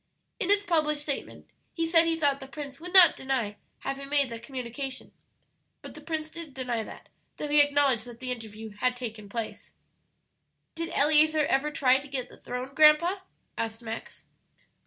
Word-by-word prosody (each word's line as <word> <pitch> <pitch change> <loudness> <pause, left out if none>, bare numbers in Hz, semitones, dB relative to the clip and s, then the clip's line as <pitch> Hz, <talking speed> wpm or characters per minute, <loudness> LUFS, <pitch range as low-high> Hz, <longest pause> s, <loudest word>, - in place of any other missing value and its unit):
"In 395 -5 -2
his 405 0 +4
published 305 -5 +1
statement 285 -2 -5 0.2
he 330 - -1
said 330 0 +5
he 330 0 +1
thought 285 -3 +2
the 270 - -9
Prince 275 -1 -7
would 355 +2 -8
not 370 -2 +8
deny 250 -6 -2 0.2
having 275 0 -5
made 285 -2 +3
that 230 -1 -7
communication. 255 +1 -5 0.7
But - - -8
the - - -11
Prince 315 -1 -4
did 330 -5 -7
deny 245 -3 -2
that, - - -11 0.3
though 300 - -4
he 295 0 +7
acknowledged 285 -5 +3
that 240 -1 -11
the 255 0 -4
interview 220 -2 -7
had 245 +5 -1
taken 220 -4 -7
place." 230 +1 -6 1.0
"Did 330 0 -4
Eleazer 310 +1 +4
ever 275 +3 +1
try 265 -3 +3
to 280 - -11
get 260 -3 -4
the - - -15
throne, 250 +2 -6
grandpa?" 310 +5 +5 0.4
asked 225 +1 -3
Max. 225 0 -8
275 Hz, 175 wpm, -28 LUFS, 245-310 Hz, 1.0 s, not